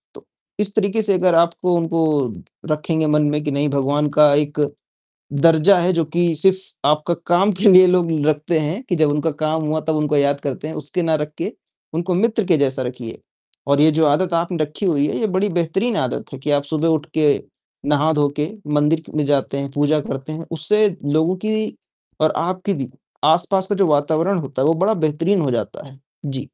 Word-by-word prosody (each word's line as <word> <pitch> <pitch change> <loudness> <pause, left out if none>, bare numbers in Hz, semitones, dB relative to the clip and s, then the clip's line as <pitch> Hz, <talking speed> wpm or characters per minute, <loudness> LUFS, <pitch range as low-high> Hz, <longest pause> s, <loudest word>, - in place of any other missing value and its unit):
तो - - -13 0.4
इस 205 -1 0
तरीके 215 +1 +1
से 205 - +2
अगर 180 -1 +2
आपको 170 +2 +2
उनको 165 -1 0 0.7
रखेंगे 155 +1 -1
मन 150 0 +2
में 150 0 -2
कि 145 - -2
नहीं 145 +1 0
भगवान 140 +2 0
का 150 -1 +6
एक 145 0 -1 0.7
दर्जा 165 +6 +4
है 180 +2 +1
जो 165 -1 +1
कि 170 +1 0
सिर्फ़ 190 +4 +3 0.3
आपका 150 +3 +1
काम 185 +4 +3
के 210 - +5
लिए 185 0 +8
लोग 180 -2 +2 0.2
रखते 155 +2 +1
हैं 165 - -3
कि 180 - 0
जब 155 -2 +2
उनका 150 +2 0
काम 155 +1 0
हुआ 155 +1 -1
तब 160 - +1
उनको 150 0 0
याद 140 0 +1
करते 140 +2 -5
हैं, - - -6
उसके 155 +5 -3
ना 165 -1 +1
रख 150 0 -3
के - - -3 0.4
उनको 175 +3 -1
मित्र 220 +3 +1
के 175 -3 +3
जैसा 135 -1 0
रखिए। 125 -2 -7 0.5
और 140 0 +3
ये 155 +1 +6
जो 160 0 +2
आदत 170 +4 +1
आपने 170 +1 -1
रखी 155 +7 -5
हुई 150 -5 +2
है, - - -3
ये 220 - 0
बड़ी 190 +1 0
बेहतरीन 180 +7 -1
आदत 130 +1 -3
है - - -7
कि 150 - -3
आप 145 -1 +2
सुबह 155 +2 -1
उठके 155 -2 +1 0.5
नहा-धोके 150 0 +1 0.2
मंदिर 150 +2 +2
क - - -14
में 150 - +1
जाते 140 -1 0
हैं, 140 0 -4
पूजा 145 +2 +1
करते 135 +1 -6
हैं। 165 +1 -7
उससे 210 +7 +2 0.2
लोगों 160 +5 +1
की 215 +2 -2 0.4
और 155 0 +3
आपके 185 +4 -2
भी 135 -4 -5 0.3
आस-पास 180 +4 +2
का 205 - 0
जो 195 -2 +3
वातावरण 160 +5 +1
होता 135 -4 -3
है - - +2
वो 165 - +3
बड़ा 195 +6 +1
बेहतरीन 165 +3 0
हो 140 - 0
जाता 120 +4 -4
है। 135 0 -17 0.3
जी। 135 -2 -4
155 Hz, 205 wpm, -19 LUFS, 145-180 Hz, 0.7 s, लिए